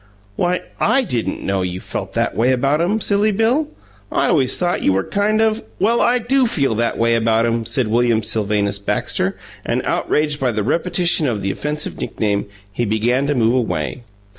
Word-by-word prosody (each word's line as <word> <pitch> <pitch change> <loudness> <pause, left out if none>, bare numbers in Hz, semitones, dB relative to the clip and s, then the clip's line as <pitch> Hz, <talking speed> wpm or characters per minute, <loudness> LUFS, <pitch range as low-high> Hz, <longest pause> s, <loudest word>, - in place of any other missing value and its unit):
"Why, 180 +6 0 0.2
I 270 - +3
didn't 125 - -3
know 95 -1 0
you 90 0 -3
felt - - -6
that - - 0
way 120 +4 +2
about 140 +5 +1
'em, 200 +6 +1
Silly 205 +1 +2
Bill. 235 +9 +1 0.4
I - - +1
always 135 -7 +2
thought 175 -1 0
you 95 - +2
were 95 0 +1
kind 205 - 0
of 220 0 +1
" - - -31
"Well, 225 +5 +2
I 245 +1 +3
do 250 +2 +2
feel 140 - +1
that 115 +1 -1
way 115 0 +2
about 115 0 +2
'em!" 115 -1 -1
said 115 +2 0
William 115 0 +2
Sylvanus 105 -2 -1
Baxter, 100 - -1 0.3
and, - - -1
outraged 150 -1 0
by 125 -3 0
the 105 -1 -1
repetition 175 - +1
of 110 -6 -2
the 95 - 0
offensive 150 +5 -4
nickname, 100 -1 -2 0.3
he 120 - -1
began 120 +5 +1
to 145 - 0
move 115 -1 +2
away. 120 -4 -1
125 Hz, 190 wpm, -19 LUFS, 110-180 Hz, 0.4 s, I